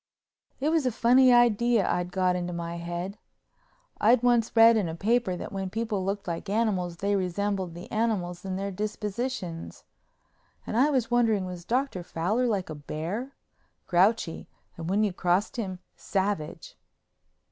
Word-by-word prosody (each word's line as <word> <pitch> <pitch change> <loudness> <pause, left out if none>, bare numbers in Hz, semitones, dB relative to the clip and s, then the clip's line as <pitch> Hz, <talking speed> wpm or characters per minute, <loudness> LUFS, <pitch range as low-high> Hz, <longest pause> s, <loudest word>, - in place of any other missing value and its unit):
It 285 +3 +1
was 315 -5 +2
a - - +1
funny 250 +3 +5
idea 240 -2 +4
I'd 180 0 -1
got 185 -1 +1
into 175 0 -3
my 170 0 -4
head. 175 +4 -5 0.8
I'd 230 +3 +4
once 240 -2 +2
read 230 0 +8
in 200 -6 0
a 160 - -5
paper 220 +1 +1
that - - -7
when 195 -1 -3
people 220 -2 -2
looked 195 +1 -3
like 170 +3 -4
animals 195 -5 0
they 200 +3 0
resembled 190 -1 -2
the 175 - -9
animals 205 -6 -1
in 190 -1 -3
their 200 +1 -3
dispositions—and 210 -2 -6
I 265 +6 +4
was 255 -5 0
wondering 225 -5 +2
was 180 -2 -7
Dr. 250 -4 -1
Fowler 185 +9 -1
like 195 -7 -1
a - - -5
bear, 170 - -5 0.5
grouchy 185 -1 +1 0.3
and 165 0 -6
when 205 +3 +2
you 205 -3 0
crossed 180 +6 0
him 190 -5 -3 0.2
savage. 190 -5 -3
200 Hz, 155 wpm, -27 LUFS, 180-230 Hz, 0.8 s, read